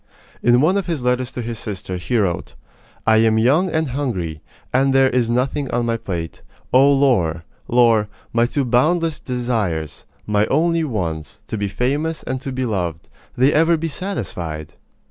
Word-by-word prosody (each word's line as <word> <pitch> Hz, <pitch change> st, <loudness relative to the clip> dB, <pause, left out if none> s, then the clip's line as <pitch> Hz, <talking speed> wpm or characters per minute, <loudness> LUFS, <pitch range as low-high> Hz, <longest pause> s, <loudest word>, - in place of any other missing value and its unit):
In 120 Hz, +1 st, +4 dB
one 180 Hz, +7 st, +3 dB
of 195 Hz, -, -2 dB
his 160 Hz, -7 st, -2 dB
letters 125 Hz, 0 st, 0 dB
to 125 Hz, -, -4 dB
his 115 Hz, -2 st, -5 dB
sister, 95 Hz, -3 st, -5 dB
he 120 Hz, +7 st, -1 dB
wrote: 90 Hz, -6 st, -1 dB, 0.5 s
I 110 Hz, -1 st, +5 dB
am 110 Hz, 0 st, +4 dB
young 140 Hz, +12 st, +3 dB
and 160 Hz, -3 st, 0 dB
hungry, 100 Hz, -, -3 dB, 0.3 s
and 135 Hz, +1 st, +3 dB
there 135 Hz, -1 st, +5 dB
is 120 Hz, -2 st, +1 dB
nothing 130 Hz, +3 st, 0 dB
on 120 Hz, 0 st, 0 dB
my 115 Hz, 0 st, 0 dB
plate. 85 Hz, -6 st, -5 dB, 0.3 s
Oh, 135 Hz, +2 st, +6 dB
Laure, 110 Hz, -, +2 dB, 0.2 s
Laure, 115 Hz, -3 st, +4 dB, 0.3 s
my 115 Hz, +1 st, +3 dB
two 140 Hz, +2 st, -1 dB
boundless 155 Hz, +6 st, +2 dB
desires, 110 Hz, -, -2 dB, 0.2 s
my 105 Hz, 0 st, +1 dB
only 165 Hz, +3 st, +2 dB
ones 100 Hz, -, -4 dB
to -, -, -5 dB
be 100 Hz, -1 st, -1 dB
famous, 145 Hz, +10 st, -1 dB
and 130 Hz, +1 st, -3 dB
to 135 Hz, -, -5 dB
be 130 Hz, 0 st, -2 dB
loved 90 Hz, -8 st, -3 dB, 0.3 s
they 130 Hz, +4 st, +4 dB
ever 165 Hz, +2 st, +4 dB
be 165 Hz, +1 st, -3 dB
satisfied? 85 Hz, -, -5 dB
120 Hz, 170 wpm, -20 LUFS, 105-140 Hz, 0.5 s, Oh